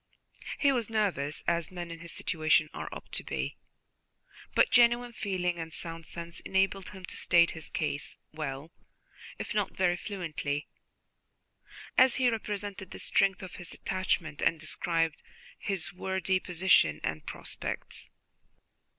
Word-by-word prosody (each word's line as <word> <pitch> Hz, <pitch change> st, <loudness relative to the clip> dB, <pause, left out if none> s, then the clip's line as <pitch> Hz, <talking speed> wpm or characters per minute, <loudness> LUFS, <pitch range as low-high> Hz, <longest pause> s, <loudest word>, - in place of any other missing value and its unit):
He 280 Hz, -, +4 dB
was 240 Hz, -5 st, 0 dB
nervous, 185 Hz, -10 st, 0 dB
as 170 Hz, -1 st, +2 dB
men 175 Hz, -2 st, -6 dB
in 165 Hz, -, -7 dB
his 170 Hz, -1 st, -7 dB
situation 155 Hz, -2 st, +2 dB
are -, -, -5 dB
apt -, -, -9 dB
to -, -, -2 dB
be, -, -, -3 dB, 1.0 s
but -, -, +5 dB
genuine 240 Hz, 0 st, +5 dB
feeling 180 Hz, -5 st, -1 dB
and 165 Hz, 0 st, -5 dB
sound 165 Hz, 0 st, -5 dB
sense 170 Hz, 0 st, -6 dB
enabled 190 Hz, 0 st, +1 dB
him 190 Hz, -2 st, -9 dB
to -, -, -5 dB
state 170 Hz, -1 st, +5 dB
his 160 Hz, -2 st, -8 dB
case 150 Hz, -3 st, -2 dB
well, 150 Hz, 0 st, -5 dB, 0.7 s
if -, -, -4 dB
not 210 Hz, -2 st, 0 dB
very 180 Hz, -2 st, +3 dB
fluently, 160 Hz, -7 st, -3 dB, 1.3 s
as 260 Hz, -1 st, +7 dB
he 255 Hz, -2 st, +4 dB
represented 205 Hz, -4 st, -4 dB
the -, -, -8 dB
strength 195 Hz, -1 st, +2 dB
of 185 Hz, -, -8 dB
his 175 Hz, -1 st, -7 dB
attachment 180 Hz, -5 st, -1 dB
and 165 Hz, -, +3 dB
described 165 Hz, +1 st, 0 dB, 0.4 s
his 195 Hz, -2 st, -1 dB
worldly 190 Hz, 0 st, 0 dB
position 175 Hz, -, +4 dB
and 80 Hz, -1 st, -3 dB
prospects. -, -, -4 dB
180 Hz, 140 wpm, -30 LUFS, 160-195 Hz, 1.3 s, as